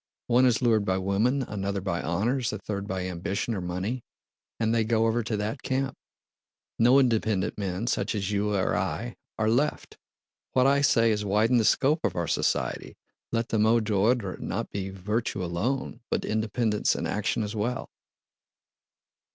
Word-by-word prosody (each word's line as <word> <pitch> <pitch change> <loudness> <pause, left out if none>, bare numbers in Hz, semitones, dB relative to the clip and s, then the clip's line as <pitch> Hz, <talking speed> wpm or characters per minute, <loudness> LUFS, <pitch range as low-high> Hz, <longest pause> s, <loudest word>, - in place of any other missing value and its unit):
One 125 +2 +4
is 125 +1 +1
lured 110 -3 +3
by 95 -1 0
women, 105 +8 +1
another 100 -3 -3
by 90 -3 -2
honors, 115 +9 0
a 105 - -3
third 100 -1 -5
by 95 -2 -3
ambition 95 +5 -2
or 95 - -3
money, 95 +8 -3 0.6
and 110 -1 +1
they 115 -1 +3
go 110 0 +2
over 115 +1 +2
to 110 -1 -2
that 105 +6 -3
camp. 135 0 -1 0.8
No 120 +4 +6
independent 110 -7 +2
men, 95 +2 -2
such 120 - -1
as 100 -1 -2
you 105 0 0
or 95 - +1
I, - - -2 0.2
are 110 - +1
left. 130 +7 0 0.5
What 130 -1 +4
I 140 +1 +4
say 115 -5 +4
is 105 -1 0
widen 105 +5 +3
the 115 - +3
scope 145 +8 +3
of - - 0
our 85 -2 -1
society, - - -1 0.3
let 115 0 -1
the 110 - +1
mot 110 +1 +4
d'ordre 105 -1 +1
be - - -7
not - - -3
virtue 95 +1 -2
alone 120 +9 -2
but - - -1
independence 110 0 0
and - - -2
action 105 +2 -1
as 105 +1 -4
well!" 120 +4 -2
110 Hz, 170 wpm, -27 LUFS, 100-120 Hz, 0.8 s, No